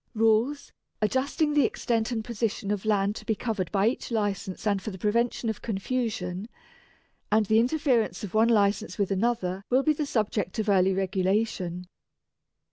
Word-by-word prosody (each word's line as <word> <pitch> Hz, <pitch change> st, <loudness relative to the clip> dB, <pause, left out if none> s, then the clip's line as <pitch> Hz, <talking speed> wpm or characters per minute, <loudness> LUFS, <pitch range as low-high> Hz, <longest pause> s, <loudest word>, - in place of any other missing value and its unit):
Rules, 225 Hz, +6 st, +2 dB, 0.3 s
adjusting 270 Hz, +7 st, +1 dB
the 290 Hz, -1 st, +4 dB
extent 225 Hz, -2 st, 0 dB
and 230 Hz, -3 st, -2 dB
position 225 Hz, -3 st, -2 dB
of 210 Hz, 0 st, -2 dB
land 205 Hz, -1 st, +1 dB
to -, -, -9 dB
be 220 Hz, 0 st, 0 dB
covered 205 Hz, -6 st, -3 dB
by 200 Hz, 0 st, +2 dB
each 235 Hz, -, -2 dB
License 205 Hz, -4 st, -2 dB
and 200 Hz, -2 st, +1 dB
for 220 Hz, -, -5 dB
the 190 Hz, -, -7 dB
prevention 230 Hz, +4 st, 0 dB
of 220 Hz, -3 st, -3 dB
confusion, 210 Hz, -3 st, -3 dB, 0.8 s
and 215 Hz, 0 st, +4 dB
the 220 Hz, +2 st, +4 dB
interference 250 Hz, -3 st, +1 dB
of 200 Hz, -, -6 dB
one 220 Hz, +2 st, +4 dB
License 210 Hz, 0 st, +2 dB
with 200 Hz, -2 st, 0 dB
another 195 Hz, -2 st, 0 dB
will 255 Hz, +2 st, +3 dB
be 310 Hz, -, +3 dB
the 300 Hz, -1 st, -3 dB
subject 210 Hz, -5 st, -1 dB
of 215 Hz, -1 st, -1 dB
early 190 Hz, -1 st, +4 dB
regulation. 190 Hz, -1 st, -1 dB
215 Hz, 165 wpm, -27 LUFS, 195-235 Hz, 0.8 s, the